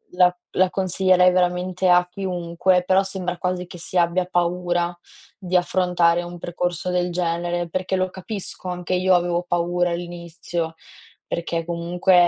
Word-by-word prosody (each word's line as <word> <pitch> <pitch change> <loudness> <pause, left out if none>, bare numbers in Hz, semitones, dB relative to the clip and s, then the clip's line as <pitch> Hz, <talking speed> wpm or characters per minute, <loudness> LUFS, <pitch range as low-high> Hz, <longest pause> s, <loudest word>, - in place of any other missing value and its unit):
la 180 0 +4 0.2
la 185 0 +4
consiglierei 185 -1 +3
veramente 180 +1 +1
a 180 0 +5
chiunque. 180 -1 0
Però 190 +1 +4
sembra 185 -2 -3
quasi 180 0 -2
che 180 - -10
si 180 - -2
abbia 175 +1 +2
paura 175 0 0 0.4
di 185 -1 -3
affrontare 175 -1 +2
un 175 0 -8
percorso 175 +1 -2
del 180 0 0
genere, 175 0 -1
perché 185 +2 -1
lo 185 0 0
capisco. 190 -1 -5
Anche 180 0 -3
io 185 0 +4
avevo 175 0 +1
paura 175 0 +1
all'inizio, 170 -1 -4 0.5
perché 170 -1 -2
comunque 175 +2 0
180 Hz, 140 wpm, -22 LUFS, 175-185 Hz, 0.5 s, a